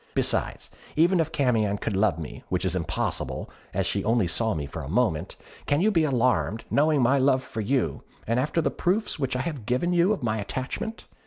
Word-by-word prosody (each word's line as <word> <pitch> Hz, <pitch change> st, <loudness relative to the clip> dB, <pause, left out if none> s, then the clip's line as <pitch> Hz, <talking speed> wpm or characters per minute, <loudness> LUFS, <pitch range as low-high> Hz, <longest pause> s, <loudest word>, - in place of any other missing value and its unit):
Besides, -, -, 0 dB, 0.2 s
even 175 Hz, +3 st, +4 dB
if 160 Hz, -1 st, 0 dB
Camion 115 Hz, -9 st, +1 dB
could 105 Hz, 0 st, -3 dB
love 100 Hz, -4 st, +2 dB
me, 80 Hz, -3 st, -7 dB
which 90 Hz, 0 st, 0 dB
is 95 Hz, -1 st, 0 dB
impossible, 85 Hz, -3 st, -2 dB, 0.2 s
as -, -, -1 dB
she -, -, -1 dB
only 115 Hz, -2 st, +2 dB
saw 110 Hz, +5 st, 0 dB
me 75 Hz, -2 st, -3 dB
for 70 Hz, -, -6 dB
a 65 Hz, -, -7 dB
moment, 100 Hz, -5 st, 0 dB, 0.3 s
can 145 Hz, -, +2 dB
you 210 Hz, +5 st, +3 dB
be 165 Hz, -5 st, +3 dB
alarmed, 125 Hz, -5 st, +1 dB
knowing 150 Hz, -2 st, +3 dB
my 135 Hz, +3 st, +4 dB
love 130 Hz, -1 st, +3 dB
for 110 Hz, -, -5 dB
you, 130 Hz, +4 st, 0 dB, 0.2 s
and 115 Hz, +2 st, +1 dB
after 155 Hz, +5 st, 0 dB
the -, -, +1 dB
proofs 190 Hz, 0 st, -1 dB
which 130 Hz, -2 st, -1 dB
I 125 Hz, -, 0 dB
have 135 Hz, -7 st, -5 dB
given 150 Hz, +9 st, +1 dB
you 175 Hz, +3 st, +4 dB
of 210 Hz, -, -1 dB
my 110 Hz, -1 st, 0 dB
attachment? 130 Hz, -, -4 dB
125 Hz, 210 wpm, -26 LUFS, 110-155 Hz, 0.3 s, even